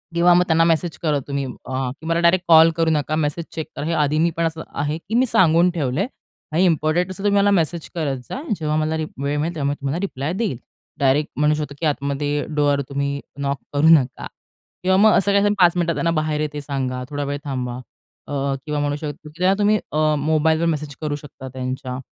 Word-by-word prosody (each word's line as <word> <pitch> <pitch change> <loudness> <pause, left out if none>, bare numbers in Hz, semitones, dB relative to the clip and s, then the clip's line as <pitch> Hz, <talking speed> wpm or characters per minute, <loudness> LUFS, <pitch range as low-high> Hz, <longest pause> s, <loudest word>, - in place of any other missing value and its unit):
किंवा 175 +1 +5
मग 175 +1 +5
त्यांना 165 0 +4
मेसेज 165 0 +1
करा 150 -3 +1
तुम्ही 140 -1 -2 0.2
अ, 130 0 -2 0.2
"मला 165 +1 +1
डायरेक्ट 175 +1 +3
कॉल 165 0 +7
करू 165 -1 +2
नका. 155 0 0
मेसेज 155 +2 -1
चेक 160 - -4
करा." 145 - -4
हे 165 - -1
आधी 150 +1 +1
मी 170 +2 +3
पण 165 - +1
असं 160 0 -3
आहे 150 +2 -2
की 195 +7 -5
मी 250 +2 +4
सांगून 175 -6 +4
ठेवलंय 155 - -1 0.4
आणि 165 +4 +2
इम्पोर्टंट 165 +1 +1
असं 195 +1 -7
तुम्ही 200 -1 +3
मला 205 0 +3
मेसेज 170 -3 0
करत 145 -5 -1
जा. 270 - -4 0.2
जेव्हा 155 -1 -1
मला 155 +1 0
रि 160 - -2 0.2
वेळ 140 +1 -1
मिळेल 165 +3 -2
तेव्हा 140 -3 -1
मी 145 - -1
तुम्हाला 140 +4 -2
रिप्लाय 155 -5 -3
देईल. 195 - -2 0.4
डायरेक्ट 140 +2 +2
म्हणू 150 0 +3
शकतो 150 -2 -5
की 165 - -2
आतमध्ये 145 0 -1
डोर 145 -1 +2
तुम्ही 140 0 -2 0.2
नॉक 140 0 -1 0.2
करू 145 +2 +3
नका 135 -6 +3 0.6
किंवा 190 +1 +3
मग 215 +2 +6
असं 200 +1 +2
काही 205 +1 +3
पाच 175 -2 +6
मिनिटात 170 -2 0
त्यांना 170 - 0
बाहेर 155 -2 -1
येते 150 -1 -3
सांगा. 130 -3 -3
थोडा 145 0 -3
वेळ 145 0 -3
थांबा 125 -3 -3 0.5
अ, - - -4 0.3
किंवा 150 -1 -2
म्हणू 145 0 0
शकतो 150 0 -7
की 150 - -19
त्यांना 185 +2 +3
तुम्ही 210 +1 +4
अ, 155 0 +2
मोबाईलवर 160 +2 +2
मेसेज 150 -3 -2
करू 150 -2 -2
शकता 145 -2 -10
त्यांच्या 130 0 -4
155 Hz, 215 wpm, -21 LUFS, 145-170 Hz, 0.6 s, कॉल